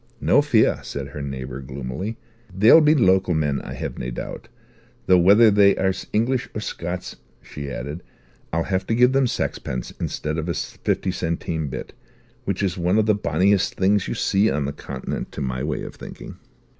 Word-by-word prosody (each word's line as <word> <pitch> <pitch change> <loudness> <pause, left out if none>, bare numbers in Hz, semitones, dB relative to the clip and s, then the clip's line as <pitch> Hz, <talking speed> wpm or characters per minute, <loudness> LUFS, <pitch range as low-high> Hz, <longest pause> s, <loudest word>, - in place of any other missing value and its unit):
"No - - +4
fear," - - +3
said 70 -1 -6
her 70 +1 -7
neighbour 65 -1 -5
gloomily. 70 - -5 0.3
"They'll 110 - +7
be 155 +1 +5
local 95 - +3
men, 75 -3 0
I - - -7
have - - -5
nae - - -3
doubt. - - -7 0.6
Though 90 -1 +5
whether 105 +5 +6
they 100 -1 +5
are 95 0 +2 0.2
English 120 +4 0
or - - -2
Scots," 90 -2 -5 0.3
she 70 -1 -7
added, 70 +6 -5 0.5
"I'll 85 +1 0
have 95 +1 -2
to 115 - +1
give 125 +2 +5
them 135 -1 +3
saxpence 65 - -3
instead 75 +1 -3
of 80 +2 -4
a 85 - -1
fifty 95 - -2
centime 85 -3 -2
bit; 65 - -6 0.5
which - - -1
is 90 -2 -1
one 90 +4 +2
of 110 - +3
the 110 - +4
bonniest 95 +1 +1
things 100 +1 +2
you - - -3
see 100 +3 +2
on 75 - -1
the 70 - -3
Continent, - - -6
to - - -5
my 65 -1 -2
way 75 0 -2
of - - -7
thinking." - - -10
90 Hz, 185 wpm, -23 LUFS, 70-100 Hz, 0.6 s, They'll